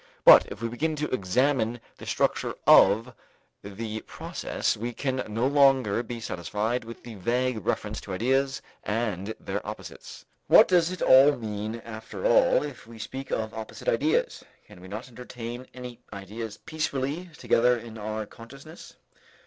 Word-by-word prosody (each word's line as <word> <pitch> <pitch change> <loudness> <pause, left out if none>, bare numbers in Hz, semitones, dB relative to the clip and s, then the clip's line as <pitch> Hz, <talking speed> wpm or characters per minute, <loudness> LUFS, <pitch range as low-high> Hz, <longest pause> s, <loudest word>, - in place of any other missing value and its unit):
But - - +9
if 110 - -8
we - - +1
begin 155 +7 -2
to 150 -2 -3
examine 120 +3 +1 0.2
the - - -10
structure - - 0
of 115 +6 +6 0.5
the 110 +2 -6
process, - - -2
we 120 +3 -4
can 130 +2 -2
no 110 +3 -1
longer 135 -6 +4
be 120 0 -6
satisfied 110 +5 -2
with 115 +1 -10
the 120 - -9
vague 120 +2 -1
reference - - -2
to - - -7
ideas 135 +5 0 0.2
and 105 -2 -2
their - - -4
opposites. - - -9 0.2
What - - +8
does 175 -2 +3
it 185 -1 -4 0.4
mean 110 +1 -5
after 110 - -7
all - - +4
if - - -8
we 115 0 -12
speak 130 +5 -7
of 110 -1 -2
opposite 110 -1 -8
ideas? 145 +7 +1 0.2
Can 90 - -15
we 95 - -11
not 105 +6 -6
entertain 125 0 -8
any 125 -2 -9
ideas 105 +2 -7
peacefully 155 +1 -3
together 125 +1 +3
in 115 -1 -9
our 110 +1 -4
consciousness? 140 +9 -13
115 Hz, 150 wpm, -27 LUFS, 110-135 Hz, 0.5 s, But